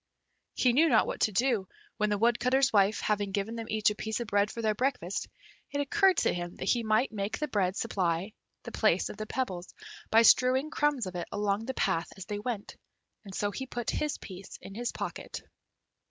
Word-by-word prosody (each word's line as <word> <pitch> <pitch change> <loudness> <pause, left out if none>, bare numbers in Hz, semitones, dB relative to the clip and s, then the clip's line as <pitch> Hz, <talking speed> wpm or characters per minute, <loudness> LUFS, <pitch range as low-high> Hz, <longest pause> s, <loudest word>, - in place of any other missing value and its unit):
He 250 -2 +3
knew 320 +6 +5
not 225 -5 +5
what - - -4
to 215 - +2
do, 225 -2 +1 0.3
when 210 0 +1
the 205 - +1
Woodcutter's 250 +4 +3
wife, 200 0 +3
having 205 -2 0
given 200 +3 -2
them 225 -1 -5
each 215 -1 +2
a - - -5
piece 220 +1 -3
of 240 - -3
bread 205 0 +2
for 230 - -7
their 215 -1 +2
breakfast, 235 -5 -1 0.4
it 285 - -3
occurred 380 +5 +3
to - - +2
him 175 0 -5
that - - -3
he 240 - +3
might 220 +3 +2
make 205 -1 -3
the 300 - -2
bread 195 -7 0
supply 185 -2 -1 0.3
the - - -7
place - - +2
of - - -8
the 215 0 -5
pebbles 185 -10 -4 0.3
by 225 +1 +6
strewing 260 +5 +5
crumbs 295 -6 +1
of 185 - -6
it 175 -1 -4
along 205 +1 0
the 265 - -3
path 180 -4 0
as 190 - -7
they 205 -1 -4
went, 215 -2 -5 0.5
and 195 -1 -8
so 205 0 0
he 265 +5 -5
put 240 -2 -3
his 300 -1 -1
piece 190 0 -10
in 195 - -10
his 240 +3 -3
pocket. - - -6
215 Hz, 210 wpm, -30 LUFS, 200-250 Hz, 0.5 s, by